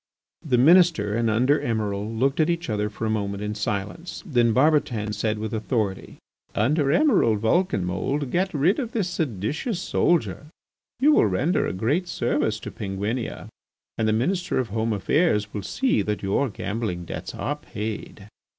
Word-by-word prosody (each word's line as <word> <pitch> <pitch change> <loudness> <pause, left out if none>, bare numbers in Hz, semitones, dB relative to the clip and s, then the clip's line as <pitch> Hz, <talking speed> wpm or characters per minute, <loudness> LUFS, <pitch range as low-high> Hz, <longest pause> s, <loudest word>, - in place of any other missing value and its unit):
The 130 -6 +1
Minister 150 - +5
and 115 0 +1
the - - +2
Under 130 +6 +3
Emiral 105 -2 -2
looked 135 +6 0
at 155 - +3
each 170 -7 -1
other 105 0 -1
for 110 +1 -5
a - - 0
moment 100 -1 -2
in 105 0 -2
silence. 105 - -4
Then 120 - +2
Barbotan 125 -6 +2
said 105 +1 -1
with 110 0 -4
authority: 110 -3 -2 0.4
"Under 145 +8 +2
Emiral 205 - +3
Vulcanmould, 125 - 0
get 190 +2 +1
rid 160 - +2
of 240 -4 -4
this 210 -6 0
seditious 155 - -2
soldier. 170 -4 0 0.5
You 290 +4 +5
will 290 - +5
render 150 - +1
a - - -2
great 140 - 0
service 115 -8 0
to - - -6
Penguinia, 105 +3 -4 0.5
and 110 - 0
the 110 - +2
Minister 180 - 0
of 125 -4 -1
Home 110 +2 -1
Affairs 105 - +1
will 105 - -3
see 255 - 0
that 105 -1 -3
your 100 +8 +1
gambling 100 -4 -4
debts - - -6
are 145 +4 -2
paid." 105 -6 -6
115 Hz, 165 wpm, -24 LUFS, 105-155 Hz, 0.5 s, Minister